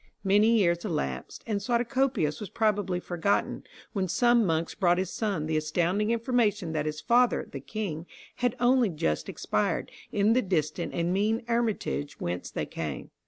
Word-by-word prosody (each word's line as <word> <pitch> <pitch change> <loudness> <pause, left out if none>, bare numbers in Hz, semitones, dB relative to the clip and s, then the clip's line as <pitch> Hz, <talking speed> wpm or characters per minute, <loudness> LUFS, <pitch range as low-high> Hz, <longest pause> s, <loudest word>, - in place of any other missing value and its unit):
Many 210 +4 +4
years 170 -4 +2
elapsed, 70 - -3
and 215 -3 -1
Suatocopius 240 - 0
was 210 - -6
probably 205 -5 0
forgotten, 180 +3 -1 0.3
when 195 -4 0
some 240 +6 +4
monks 165 0 0
brought 175 -3 +2
his 185 0 -1
son 200 -8 -1
the 155 0 0
astounding 175 +7 0
information 225 -6 +1
that 155 -1 -1
his 155 0 -3
father, 245 +1 +3
the 140 - -5
king, 170 - -5 0.3
had 245 0 0
only 245 -2 +4
just 80 - -1
expired, - - -1 0.2
in 210 +2 +3
the 255 - +3
distant 170 -3 -1
and 170 +1 0
mean 215 +4 +1
hermitage 220 - -1
whence 90 +1 -3
they - - -3
came. 75 -5 -5
195 Hz, 160 wpm, -28 LUFS, 160-225 Hz, 0.3 s, Many